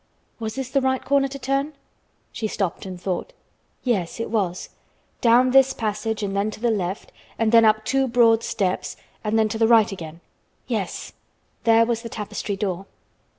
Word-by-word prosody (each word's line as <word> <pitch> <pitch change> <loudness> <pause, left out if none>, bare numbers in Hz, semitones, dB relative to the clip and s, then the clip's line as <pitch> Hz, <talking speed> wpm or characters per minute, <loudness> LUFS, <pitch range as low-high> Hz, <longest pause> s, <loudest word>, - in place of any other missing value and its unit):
Was 220 -1 -4
this 265 -2 -4
the 275 - +2
right 260 0 0
corner 280 0 +3
to 275 +1 -7
turn? 275 +3 -1 0.6
She 220 - -3
stopped 195 -2 -3
and 185 -1 -7
thought. 190 - -3 0.5
Yes 210 -7 -1
it 230 - -3
was. 190 -5 -1 0.5
Down 245 +2 +5
this 265 0 +5
passage 215 -1 -2
and 195 -1 -2
then 200 +2 +1
to 215 - -9
the 235 +1 +1
left, 190 -2 -3 0.3
and 225 -1 +1
then 230 -1 +7
up 215 0 +3
two 270 -1 +1
broad 230 -2 +4
steps, 185 -2 -2 0.3
and 215 +1 0
then 220 -1 +3
to 220 +1 -4
the 225 - +4
right 225 -2 +5
again. 165 -3 -8 0.4
Yes, - - -4 0.5
there 230 0 +6
was 230 -1 -1
the 230 - -7
tapestry 210 -1 -4
door. 195 -1 -3
225 Hz, 180 wpm, -23 LUFS, 200-245 Hz, 0.6 s, then